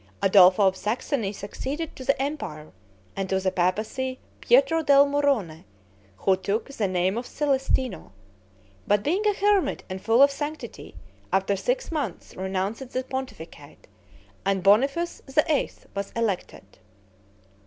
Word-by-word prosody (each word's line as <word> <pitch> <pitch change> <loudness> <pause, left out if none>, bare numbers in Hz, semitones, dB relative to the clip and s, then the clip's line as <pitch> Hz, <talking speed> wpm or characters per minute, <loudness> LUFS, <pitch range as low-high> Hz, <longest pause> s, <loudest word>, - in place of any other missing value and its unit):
Adolpho 190 0 +6
of 190 - +1
Saxony 215 +1 -2
succeeded 265 +10 -5
to 260 - -8
the 275 +1 +1
empire; 270 - -4 0.4
and 195 -1 -3
to 190 - +1
the 190 0 0
papacy, 215 +9 -1 0.2
Pietro 485 -10 +4
del 280 -2 +6
Murrone, 275 - 0 0.5
who 190 - +2
took 200 +6 -2
the 225 -7 -1
name 185 +3 0
of 245 - -8
Celestino; 265 - -1 0.8
but, 205 0 +2
being 365 +8 0
a 415 - +2
hermit 405 -2 +1
and 185 0 -5
full 230 +6 +5
of 280 - +5
sanctity, 295 +2 -6 0.4
after 195 +1 +1
six - - -2
months 285 - -4
renounced 190 +7 -3
the 255 0 -2
pontificate, 265 0 -8 0.6
and 195 -1 0
Boniface 275 - +2
VIII. 300 +2 +1 0.2
was 200 0 -4
elected. 225 -5 -3
235 Hz, 130 wpm, -25 LUFS, 195-285 Hz, 0.8 s, Adolpho